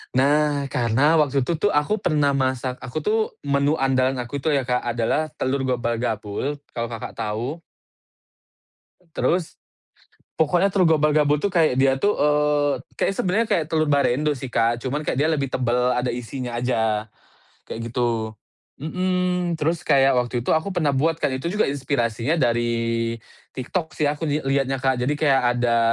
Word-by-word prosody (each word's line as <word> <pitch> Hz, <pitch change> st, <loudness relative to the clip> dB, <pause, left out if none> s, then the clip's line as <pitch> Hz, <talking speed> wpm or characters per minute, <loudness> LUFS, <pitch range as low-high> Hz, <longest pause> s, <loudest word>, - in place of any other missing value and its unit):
Nah, 145 Hz, +1 st, +2 dB
karena 130 Hz, +7 st, +3 dB
waktu 140 Hz, -3 st, +2 dB
itu 160 Hz, +4 st, -2 dB
tuh 205 Hz, -, +2 dB
aku 150 Hz, +9 st, +1 dB
pernah 150 Hz, -7 st, +1 dB
masak 130 Hz, -2 st, -1 dB
aku 125 Hz, +5 st, -7 dB
tuh 215 Hz, +5 st, +1 dB, 0.3 s
menu 140 Hz, +1 st, +1 dB
andalan 130 Hz, -2 st, +1 dB
aku 140 Hz, +4 st, -5 dB
tuh 150 Hz, +2 st, +1 dB
ya 135 Hz, -, +1 dB
Kak 125 Hz, 0 st, 0 dB
adalah, 120 Hz, +6 st, -1 dB
telur 135 Hz, 0 st, -1 dB
gobal-gabul 120 Hz, +1 st, -2 dB, 0.2 s
kalau 120 Hz, -1 st, -3 dB
Kakak 115 Hz, -1 st, -6 dB
tahu. 115 Hz, +8 st, -3 dB, 1.6 s
Terus, 175 Hz, -2 st, 0 dB, 0.8 s
pokoknya 175 Hz, +5 st, +3 dB
telur 175 Hz, -5 st, +3 dB
gobal-gabul 150 Hz, 0 st, +3 dB
tuh 200 Hz, -, 0 dB
kayak 160 Hz, -6 st, +3 dB
dia 135 Hz, 0 st, +4 dB
itu, 205 Hz, -, +2 dB
eee, 150 Hz, -1 st, +2 dB, 0.2 s
kayak -, -, +1 dB
sebenarnya 205 Hz, +6 st, 0 dB
kayak 170 Hz, -7 st, +1 dB
telur 155 Hz, -1 st, +1 dB
barendo 145 Hz, +1 st, +2 dB
sih, 130 Hz, -1 st, -7 dB
Kak. 115 Hz, 0 st, +1 dB
Cuman 140 Hz, +3 st, -2 dB
kayak -, -, -1 dB
dia 155 Hz, +2 st, +2 dB
lebih 140 Hz, -3 st, 0 dB
tebel 125 Hz, 0 st, +1 dB
ada 125 Hz, 0 st, -1 dB
isinya 125 Hz, 0 st, -5 dB
aja, 110 Hz, -3 st, 0 dB, 0.6 s
kayak 115 Hz, +1 st, -6 dB
gitu. 115 Hz, -3 st, -1 dB, 0.4 s
Mhm, 180 Hz, +2 st, -1 dB
terus 160 Hz, +2 st, -1 dB
kayak 135 Hz, 0 st, +4 dB
waktu 120 Hz, -1 st, -3 dB
itu -, -, +1 dB
aku 160 Hz, +4 st, +1 dB
pernah 175 Hz, -7 st, 0 dB
buat 155 Hz, +4 st, +1 dB
Kak, 150 Hz, -4 st, -1 dB
itu 170 Hz, -, -3 dB
juga 210 Hz, +5 st, +1 dB
inspirasinya 135 Hz, 0 st, -1 dB
dari 115 Hz, -3 st, 0 dB, 0.4 s
TikTok 160 Hz, +6 st, -4 dB
sih 150 Hz, -, 0 dB
aku 150 Hz, +2 st, -1 dB
li 145 Hz, +1 st, 0 dB
lihatnya, 135 Hz, 0 st, +1 dB
Kak. 130 Hz, -1 st, 0 dB
Jadi 140 Hz, +4 st, 0 dB
kayak 135 Hz, -5 st, +2 dB
ada, 120 Hz, -1 st, +2 dB
140 Hz, 160 wpm, -23 LUFS, 125-155 Hz, 1.6 s, dia